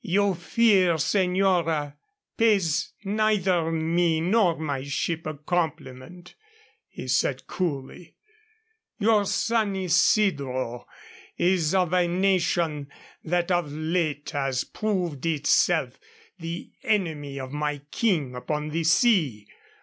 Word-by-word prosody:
"Your 200 0 +2
fear, 185 -1 +3
señora, 175 -4 +1 0.4
pays 200 -9 +2
neither 195 -5 +1
me 165 0 +1
nor 180 0 +2
my 145 -4 -3
ship 155 +3 -3
a 155 - -4
compliment," 160 0 -4 0.6
he - - -9
said, - - 0
coolly. 165 -1 -5 0.8
"Your 215 -1 +3
San 220 -1 0
Isidro 165 - +1 0.5
is 175 -2 +1
of 180 -2 +1
a 180 -1 +3
nation 170 -5 0 0.4
that 175 +2 0
of 175 -5 0
late 155 -1 -2
has 135 -3 -1
proved 180 -10 -3
itself 150 -3 +1 0.4
the 165 +1 -6
enemy 155 -9 -1
of 130 -1 -7
my 150 0 -2
King 165 - 0
upon 150 +4 -3
the 165 +2 -2
sea. 160 - +2
170 Hz, 105 wpm, -25 LUFS, 150-190 Hz, 0.8 s, fear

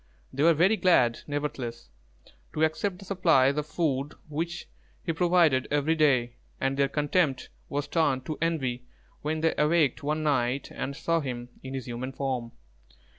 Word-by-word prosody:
They 135 - -2
were 165 +1 +5
very 190 +8 +4
glad, 125 - +3
nevertheless, 140 -5 -4 0.6
to 155 - 0
accept 180 +4 0
the 195 - -12
supplies 165 -8 +3
of 150 0 -2
food 145 -4 -1
which 165 +4 -4 0.4
he 165 - -1
provided 165 -6 +3
every 145 +2 +2
day; 130 -7 +2 0.2
and 135 0 0
their 140 0 +2
contempt 145 -1 0 0.2
was 145 +1 -2
turned 145 -5 +1
to 155 - -5
envy 130 -7 -1 0.3
when 155 +1 -2
they 160 0 +2
awaked 150 -2 +3
one 150 +2 -1
night 140 -3 0
and 140 +1 -4
saw 165 +2 0
him 125 -4 -5
in 130 0 -6
his 130 -2 -4
human 125 +2 -5
form. 130 -4 -3
145 Hz, 160 wpm, -27 LUFS, 130-165 Hz, 0.6 s, were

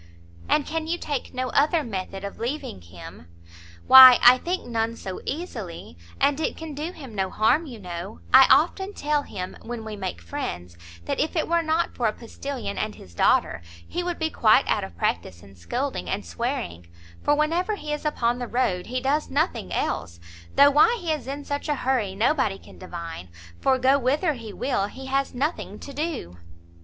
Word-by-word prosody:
"And 300 - +3
can 320 0 -3
you 340 +2 -1
take 290 -6 -4
no 255 0 -3
other 305 +4 +2
method 195 -3 -5
of 200 - -7
leaving 235 - -4
him?" 85 -1 -12 0.6
"Why 260 -1 +11
I 250 +1 +8
think 360 +5 -3
none 230 -1 -1
so 190 -4 -7
easily; 225 - -6 0.2
and 285 +1 +2
it 320 - -2
can 320 -2 -7
do 305 +4 -4
him 270 -10 -11
no 190 -2 -1
harm, 255 - +2
you 245 -4 -8
know; 180 +1 -7
I 265 0 +9
often 355 +8 +3
tell 295 0 0
him, 185 -9 -7
when 235 -1 -6
we 215 -1 -6
make 190 - -5
friends, 85 +1 -6 0.3
that - - -2
if 310 - 0
it 320 - 0
were 340 0 +2
not 325 +1 0
for 240 - 0
a 215 - 0
postilion 240 -2 -6
and 215 0 -3
his 90 - -14
daughter, 85 - +2 0.3
he 355 - -3
would 350 -1 -3
be 320 -1 -1
quite 220 +4 +4
out - - +1
of 85 -3 -9
practice 85 0 -2
in 95 -1 -15
scolding 250 - -3
and 200 +1 -2
swearing; 235 - -4 0.3
for 290 - +3
whenever 335 +7 0
he 300 -6 -5
is 295 - -4
upon 245 -5 0
the 245 - -4
road 210 -8 -1
he 255 +1 -2
does 290 +3 0
nothing 285 - -1
else; 85 0 -2 0.4
though 285 +1 +7
why 440 - +5
he 340 -4 -2
is 295 -5 -3
in 280 +1 -5
such 285 +2 -4
a 295 - +2
hurry, 245 -8 -1
nobody 225 -2 +1
can - - -16
divine, 170 - -7 0.3
for 265 -1 +3
go 265 +2 +3
whither 290 +6 +1
he 230 -5 -8
will 200 -2 -1
he 265 +6 -10
has 270 0 -1
nothing 295 +7 -2
to 280 - -10
do." 295 - -4
255 Hz, 195 wpm, -25 LUFS, 200-300 Hz, 0.6 s, Why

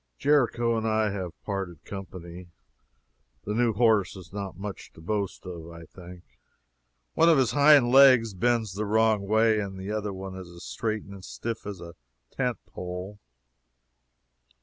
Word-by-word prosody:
Jericho 120 -5 +2
and 110 0 -1
I 110 -1 +1
have 90 -5 -6
parted 95 -5 -5
company. 90 -2 -9 1.0
The 105 - -3
new 120 +1 +2
horse 110 -4 +2
is 95 -1 -12
not 100 -3 -5
much 100 +1 -7
to - - -16
boast 100 +2 -3
of, 85 -2 -8
I 85 0 -11
think. 90 +1 -13 0.9
One 165 - +4
of 165 - +5
his 130 -4 +2
hind 145 -2 +6
legs 130 -5 +6
bends 115 0 0
the 105 +2 -3
wrong 110 -1 +2
way, 110 +1 +3
and 100 -2 -5
the 95 +2 -5
other 105 -1 -2
one 95 0 -7
is 95 -2 -9
as 85 0 -12
straight 110 -1 -3
and 100 -1 -11
stiff 115 +2 -6
as 100 -3 -6
a 85 0 -10 0.4
tent 125 -3 -1
pole. 90 +3 -7
105 Hz, 160 wpm, -27 LUFS, 95-115 Hz, 1.0 s, hind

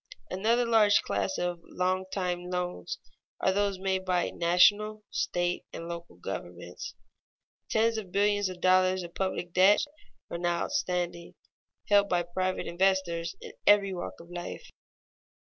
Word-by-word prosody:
Another 230 +6 +2
large 220 -3 +5
class 95 -1 -1
of 175 -1 -2
long 185 +2 -1
time 180 -2 -2
loans 180 - -3 0.4
are 190 - +2
those 200 -1 +1
made 190 0 -1
by 180 -1 0
national, 205 +5 +3
state, 175 0 -1
and 165 - -7
local 170 - -7
governments. 90 -1 -7 0.7
Tens 225 0 +2
of 190 -4 -9
billions 205 0 +2
of 180 -1 -9
dollars 185 0 +4
of 170 0 -9
public 185 -2 -3
debts 190 +7 +5 0.5
are 170 - -3
now 175 -1 0
outstanding, 175 -1 -2 0.5
held 200 -1 +4
by 175 -1 +2
private 185 +2 -2
investors 175 -2 0
in - - -8 0.2
every 200 -2 +5
walk 175 -1 -6
of 170 +1 -13
life. 175 0 -6
185 Hz, 140 wpm, -29 LUFS, 175-200 Hz, 0.7 s, large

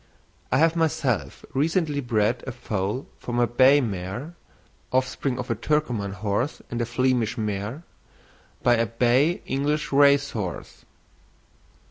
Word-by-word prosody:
I 130 - +3
have 165 +3 +4
myself 130 - -1
recently 155 +1 +1
bred 115 -1 0
a - - -2
foal 110 0 -3
from 120 -1 -4
a 120 - +4
bay 130 +4 +5
mare 105 - -4 0.6
(offspring 130 0 0
of 125 -1 -4
a - - +1
Turkoman 120 -7 -1
horse 105 +6 -2
and 120 0 -2
a 120 - -1
Flemish 125 -2 +1
mare) 105 +7 -3 0.8
by 120 -1 +4
a 115 0 +1
bay 125 - +2
English 145 +3 -1
race 140 0 +5
horse. 95 -6 -6
125 Hz, 130 wpm, -25 LUFS, 110-140 Hz, 0.8 s, bay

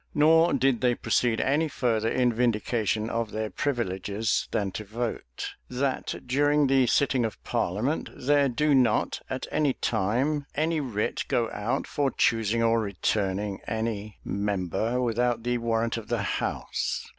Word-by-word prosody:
Nor 160 +3 +5
did 135 -3 +2
they 125 -1 +3
proceed 115 -1 +1
any 150 +4 +2
further 115 -6 0
in 125 -1 +2
vindication 110 -2 0
of 115 -1 -2
their 110 -1 -3
privileges 105 -3 -1
than 100 -4 -1
to 110 - -5
vote, 110 - -4 0.2
"That 130 +1 -2
during 145 +3 +3
the 135 -2 +3
sitting 130 0 +2
of 110 -3 -3
parliament, 115 - -1
there 140 +1 +2
do 150 +4 +2
not, 125 -5 +2
at 130 - -3
any 145 -3 +2
time, 125 +9 0
any 160 +2 +1
writ 115 -7 -2
go 115 -2 0
out 120 +6 -2
for 140 -2 0
choosing 115 -2 +1
or 115 0 +3
returning 100 -1 -1
any 110 -2 -3
member 100 +4 -1
without 120 -1 0
the 120 0 0
warrant 115 0 0
of 110 -2 -7
the 115 -3 -1
house." - - -2
115 Hz, 145 wpm, -27 LUFS, 110-130 Hz, 0.2 s, Nor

